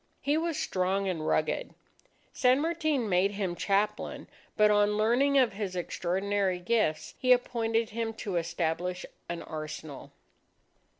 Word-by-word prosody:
He 285 Hz, +2 st, +2 dB
was 325 Hz, -1 st, -1 dB
strong 195 Hz, -6 st, 0 dB
and 160 Hz, -4 st, -2 dB
rugged. 155 Hz, -, 0 dB, 0.6 s
San 255 Hz, +1 st, +4 dB
Martin 310 Hz, -6 st, 0 dB
made 190 Hz, +1 st, +2 dB
him 195 Hz, -3 st, -2 dB
chaplain. 205 Hz, +3 st, -1 dB, 0.3 s
But 210 Hz, 0 st, +5 dB
on 205 Hz, 0 st, +3 dB
learning 250 Hz, +6 st, +3 dB
of 250 Hz, -6 st, +4 dB
his 195 Hz, -2 st, -4 dB
extraordinary 190 Hz, +2 st, -1 dB
gifts, 180 Hz, -3 st, 0 dB
he 255 Hz, -, +2 dB
appointed 230 Hz, -2 st, +2 dB
him 225 Hz, 0 st, -2 dB
to 195 Hz, -5 st, -3 dB
establish 170 Hz, +1 st, -2 dB, 0.2 s
an 170 Hz, -1 st, -4 dB
arsenal. 155 Hz, -2 st, -7 dB
205 Hz, 130 wpm, -29 LUFS, 180-235 Hz, 0.6 s, But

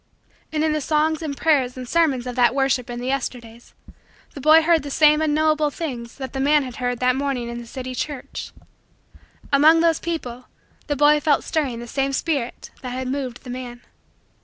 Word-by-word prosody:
And 310 Hz, -1 st, 0 dB
in 315 Hz, -, +2 dB
the 305 Hz, -, -1 dB
songs 310 Hz, +2 st, +1 dB
and 290 Hz, -3 st, -4 dB
prayers 270 Hz, -6 st, +1 dB
and 255 Hz, -1 st, -7 dB
sermons 285 Hz, -5 st, +1 dB
of 250 Hz, -1 st, -5 dB
that 245 Hz, 0 st, +3 dB
worship 270 Hz, -3 st, +1 dB
in 240 Hz, 0 st, -5 dB
the 245 Hz, -, -5 dB
Yesterdays, 245 Hz, -3 st, -5 dB, 0.6 s
the 280 Hz, -, -8 dB
boy 310 Hz, +3 st, +6 dB
heard 330 Hz, -1 st, +3 dB
the 285 Hz, -, -7 dB
same 300 Hz, +2 st, +4 dB
unknowable 310 Hz, 0 st, +2 dB
things 250 Hz, -7 st, -6 dB
that 265 Hz, -2 st, -7 dB
the 270 Hz, -, -3 dB
man 290 Hz, +2 st, +3 dB
had 255 Hz, -2 st, -8 dB
heard 245 Hz, -1 st, -1 dB
that 250 Hz, 0 st, +3 dB
morning 270 Hz, -3 st, -2 dB
in 235 Hz, 0 st, -5 dB
the 235 Hz, -, -10 dB
city 255 Hz, +1 st, -6 dB
church. 275 Hz, +1 st, -5 dB, 1.0 s
Among 310 Hz, +4 st, +6 dB
those 330 Hz, -1 st, +3 dB
people, 255 Hz, -7 st, -5 dB, 0.4 s
the 290 Hz, -, 0 dB
boy 295 Hz, +1 st, +5 dB
felt 295 Hz, -1 st, +2 dB
stirring 275 Hz, -7 st, -2 dB
the 240 Hz, -, -8 dB
same 275 Hz, +3 st, -1 dB
spirit 275 Hz, -5 st, -2 dB
that 255 Hz, -, -5 dB
had 255 Hz, 0 st, -3 dB
moved 260 Hz, -3 st, -4 dB
the 250 Hz, -, -8 dB
man. 245 Hz, -1 st, -7 dB
275 Hz, 195 wpm, -22 LUFS, 250-305 Hz, 1.0 s, boy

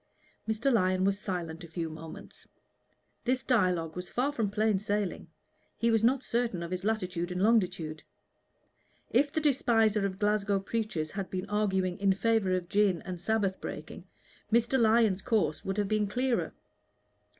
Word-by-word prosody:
Mr. 235 Hz, +5 st, +1 dB
Lyon 185 Hz, -3 st, +2 dB
was 195 Hz, +1 st, +1 dB
silent 175 Hz, -3 st, -4 dB
a -, -, -8 dB
few 165 Hz, 0 st, -4 dB
moments. 160 Hz, 0 st, -10 dB, 0.8 s
This 255 Hz, +1 st, +1 dB
dialogue 180 Hz, -9 st, +1 dB
was 180 Hz, 0 st, -6 dB
far 265 Hz, +4 st, 0 dB
from 225 Hz, -8 st, -1 dB
plain 210 Hz, -1 st, +1 dB
sailing; 205 Hz, -1 st, -2 dB, 0.5 s
he 230 Hz, 0 st, +2 dB
was 225 Hz, -1 st, +2 dB
not 260 Hz, +3 st, +3 dB
certain 230 Hz, -7 st, -1 dB
of 170 Hz, -, -6 dB
his 185 Hz, 0 st, -3 dB
latitude 185 Hz, -5 st, -1 dB
and 180 Hz, -, -3 dB
longitude. 180 Hz, -7 st, +1 dB, 1.1 s
If 280 Hz, +4 st, +3 dB
the 315 Hz, -, 0 dB
despiser 225 Hz, -8 st, +2 dB
of 190 Hz, -1 st, -7 dB
Glasgow 205 Hz, -1 st, +1 dB
preachers 195 Hz, -6 st, -3 dB
had 195 Hz, -2 st, -4 dB
been 185 Hz, +1 st, -4 dB
arguing 190 Hz, -3 st, 0 dB
in 195 Hz, -1 st, +3 dB
favor 220 Hz, -1 st, +1 dB
of 180 Hz, -1 st, -3 dB
gin 195 Hz, -3 st, +2 dB
and 180 Hz, -2 st, -6 dB
Sabbath 205 Hz, -2 st, 0 dB
breaking, -, -, -7 dB, 0.4 s
Mr. 235 Hz, +3 st, +3 dB
Lyon's 220 Hz, -4 st, +4 dB
course 215 Hz, -9 st, 0 dB
would 195 Hz, +1 st, -3 dB
have 205 Hz, -1 st, +1 dB
been 215 Hz, 0 st, +1 dB
clearer. 250 Hz, +4 st, -1 dB
205 Hz, 160 wpm, -30 LUFS, 185-225 Hz, 1.1 s, Lyon's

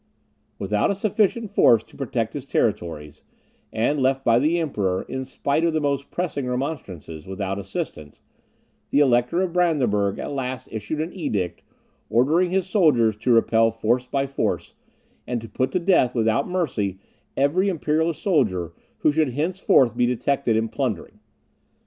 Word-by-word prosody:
Without 105 Hz, +1 st, 0 dB
a 200 Hz, -, 0 dB
sufficient 215 Hz, +2 st, 0 dB
force 115 Hz, -, +5 dB
to -, -, -21 dB
protect -, -, -2 dB
his -, -, -6 dB
territories, 75 Hz, -4 st, -2 dB, 0.5 s
and 130 Hz, +7 st, 0 dB
left 135 Hz, 0 st, +1 dB
by 115 Hz, 0 st, +5 dB
the 155 Hz, +6 st, +2 dB
Emperor, 100 Hz, -, -1 dB
in 130 Hz, 0 st, -5 dB
spite 140 Hz, +4 st, -1 dB
of 170 Hz, -1 st, +2 dB
the 155 Hz, -, +1 dB
most 140 Hz, -2 st, -1 dB
pressing 150 Hz, -7 st, -3 dB
remonstrances, 100 Hz, -, -5 dB
without 95 Hz, 0 st, -3 dB
assistance, 75 Hz, -6 st, -6 dB, 0.7 s
the -, -, +1 dB
Elector 130 Hz, +5 st, +3 dB
of 180 Hz, -3 st, -3 dB
Brandenburg 125 Hz, -, +1 dB
at -, -, -5 dB
last 130 Hz, -2 st, -4 dB
issued 110 Hz, +8 st, -3 dB
an 165 Hz, +3 st, -4 dB
edict, 100 Hz, -, -3 dB, 0.5 s
ordering 150 Hz, -, +3 dB
his 190 Hz, 0 st, 0 dB
subjects 120 Hz, -, +3 dB
to 125 Hz, -, +3 dB
repel 115 Hz, -1 st, +4 dB
force 115 Hz, +3 st, 0 dB
by 140 Hz, +1 st, 0 dB
force, 135 Hz, 0 st, -2 dB, 0.5 s
and 125 Hz, -1 st, -1 dB
to 115 Hz, -, -9 dB
put 130 Hz, +5 st, -1 dB
to -, -, +2 dB
death 170 Hz, -9 st, +3 dB
without 115 Hz, +6 st, +1 dB
mercy 115 Hz, -, -1 dB, 0.4 s
every 170 Hz, +9 st, +2 dB
Imperial 160 Hz, -1 st, 0 dB
soldier 105 Hz, -, 0 dB, 0.3 s
who 155 Hz, -, +4 dB
should 150 Hz, -4 st, +1 dB
henceforth 150 Hz, -, +2 dB
be 120 Hz, 0 st, +2 dB
detected 125 Hz, -1 st, 0 dB
in 110 Hz, +1 st, +1 dB
plundering. 110 Hz, -4 st, -4 dB
130 Hz, 155 wpm, -23 LUFS, 110-160 Hz, 0.7 s, force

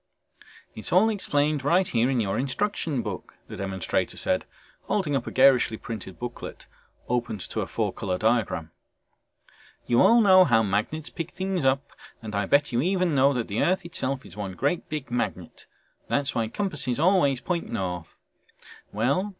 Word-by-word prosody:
"It's 110 Hz, -, -7 dB
all 205 Hz, +6 st, +5 dB
explained 150 Hz, -8 st, 0 dB
right 175 Hz, +6 st, +3 dB
here 120 Hz, +2 st, +1 dB
in 130 Hz, -2 st, +1 dB
your 100 Hz, -4 st, 0 dB
instruction 140 Hz, -, -1 dB
book," 105 Hz, -4 st, -6 dB
the -, -, -8 dB
demonstrator 95 Hz, -2 st, -2 dB
said, -, -, 0 dB, 0.4 s
holding 170 Hz, -9 st, 0 dB
up 130 Hz, -, -2 dB
a -, -, -4 dB
garishly 130 Hz, -4 st, +4 dB
printed 105 Hz, -6 st, -7 dB
booklet 120 Hz, 0 st, -7 dB, 0.4 s
opened 120 Hz, -4 st, -2 dB
to -, -, -3 dB
a -, -, -3 dB
four -, -, -2 dB
color 90 Hz, -2 st, -2 dB
diagram. 110 Hz, -7 st, 0 dB, 1.1 s
"You 120 Hz, 0 st, +3 dB
all 235 Hz, -, +6 dB
know 190 Hz, -4 st, +7 dB
how 115 Hz, -9 st, +3 dB
magnets 110 Hz, +10 st, -2 dB
pick 165 Hz, -, -4 dB
up -, -, -27 dB
things 190 Hz, -5 st, -1 dB, 0.6 s
and 110 Hz, -1 st, -6 dB
I 100 Hz, -1 st, 0 dB
bet 145 Hz, +4 st, +3 dB
you 120 Hz, 0 st, +1 dB
even 180 Hz, 0 st, +1 dB
know 135 Hz, 0 st, +4 dB
that 120 Hz, -3 st, -2 dB
the 105 Hz, +1 st, -1 dB
earth 185 Hz, 0 st, +1 dB
itself 135 Hz, -5 st, -3 dB
is -, -, -12 dB
one 100 Hz, -3 st, -5 dB
great 145 Hz, -, -1 dB
big 150 Hz, -4 st, -5 dB
magnet 120 Hz, -, -4 dB, 0.4 s
that's 140 Hz, -1 st, 0 dB
why 115 Hz, -1 st, 0 dB
compasses 145 Hz, -, -3 dB
always 155 Hz, -6 st, +3 dB
point 175 Hz, +3 st, -3 dB
north. 90 Hz, -3 st, -4 dB, 0.7 s
Well 140 Hz, -, 0 dB
130 Hz, 165 wpm, -26 LUFS, 110-170 Hz, 1.1 s, know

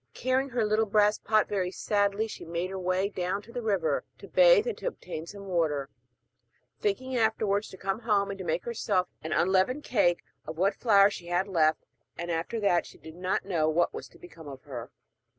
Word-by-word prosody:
Carrying 260 Hz, +2 st, 0 dB
her 240 Hz, -3 st, 0 dB
little 215 Hz, +1 st, +2 dB
brass 210 Hz, +1 st, +3 dB
pot, 215 Hz, 0 st, +2 dB
very 190 Hz, -3 st, -1 dB
sadly 205 Hz, +2 st, 0 dB
she 215 Hz, -, -8 dB
made 170 Hz, +3 st, -3 dB
her 190 Hz, -, -4 dB
way 185 Hz, +2 st, 0 dB
down 190 Hz, -1 st, -2 dB
to 235 Hz, -, -14 dB
the 245 Hz, -, -4 dB
river 195 Hz, -8 st, 0 dB
to -, -, -12 dB
bathe -, -, +6 dB
and 475 Hz, -, -2 dB
to -, -, -4 dB
obtain 170 Hz, -, -6 dB
some 200 Hz, +1 st, -9 dB
water, 155 Hz, -7 st, -1 dB, 0.9 s
thinking 255 Hz, +6 st, -1 dB
afterwards 220 Hz, -3 st, +1 dB
to 190 Hz, -, -11 dB
come 195 Hz, +3 st, -2 dB
home 205 Hz, -4 st, +1 dB
and 195 Hz, -, -7 dB
to -, -, -4 dB
make 165 Hz, 0 st, -2 dB
herself 200 Hz, -6 st, 0 dB
an 160 Hz, -, -6 dB
unleavened 190 Hz, +10 st, +2 dB
cake 175 Hz, -7 st, +2 dB, 0.2 s
of 155 Hz, +1 st, -6 dB
what 195 Hz, +4 st, +2 dB
flour 200 Hz, -2 st, +5 dB
she 170 Hz, -3 st, -8 dB
had 175 Hz, +2 st, 0 dB
left; 160 Hz, -5 st, +2 dB, 0.3 s
and 170 Hz, 0 st, -4 dB
after 165 Hz, +8 st, -2 dB
that 195 Hz, -5 st, +2 dB
she -, -, -14 dB
did 160 Hz, -, -12 dB
not 180 Hz, +2 st, -2 dB
know 165 Hz, -5 st, +1 dB
what 170 Hz, +2 st, +1 dB
was -, -, -7 dB
to -, -, -19 dB
become 165 Hz, -3 st, -13 dB
of 135 Hz, -2 st, -9 dB
her. 125 Hz, -5 st, -7 dB
195 Hz, 205 wpm, -28 LUFS, 175-215 Hz, 0.9 s, bathe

